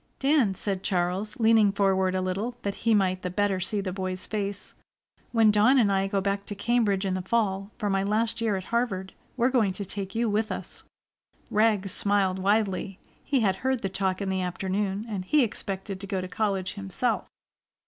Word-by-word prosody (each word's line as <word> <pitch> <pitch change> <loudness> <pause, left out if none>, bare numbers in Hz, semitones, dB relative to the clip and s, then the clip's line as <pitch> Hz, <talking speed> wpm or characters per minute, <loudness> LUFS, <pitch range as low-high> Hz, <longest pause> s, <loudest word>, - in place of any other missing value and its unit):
"Dan," 270 -8 +2
said 195 0 -2
Charles, 185 +2 -1
leaning 220 -2 +5
forward 190 -2 +2
a 185 - 0
little 205 +7 -2
that 200 - -1
he 225 +2 +1
might 185 -2 +1
the 180 - -3
better 195 0 0
see 200 +3 -1
the 185 -2 -4
boy's 185 -1 -4
face, 205 -2 -4 0.6
"when 225 -2 +5
Dawn 215 +6 +5
and 215 -6 +4
I 195 0 +1
go 195 0 0
back 200 +1 -2
to 205 - -5
Cambridge 210 -3 +1
in 190 - 0
the 185 - -1
fall, 195 -1 0
for 210 - -2
my 195 -1 +1
last 220 +3 0
year 220 -3 +1
at 190 - -3
Harvard, 195 -6 -1 0.2
we're 245 +1 +3
going 220 -7 +2
to 200 +2 -5
take 195 +2 -5
you 230 +1 +1
with 215 +1 0
us." - - -6 0.7
Rags 210 -3 +2
smiled 195 -2 +1
widely. 195 -1 0 0.3
He 275 -3 +1
had 190 -3 +2
heard 260 0 -1
the 195 - 0
talk 190 0 -1
in 195 - -2
the 190 0 0
afternoon, 190 +3 -2
and 200 -4 -3
he 285 +9 +3
expected 195 -3 -4
to 195 - -6
go 195 -1 -1
to 185 - -4
college 195 -1 -1
himself. 200 +4 -2
200 Hz, 200 wpm, -27 LUFS, 190-220 Hz, 0.7 s, leaning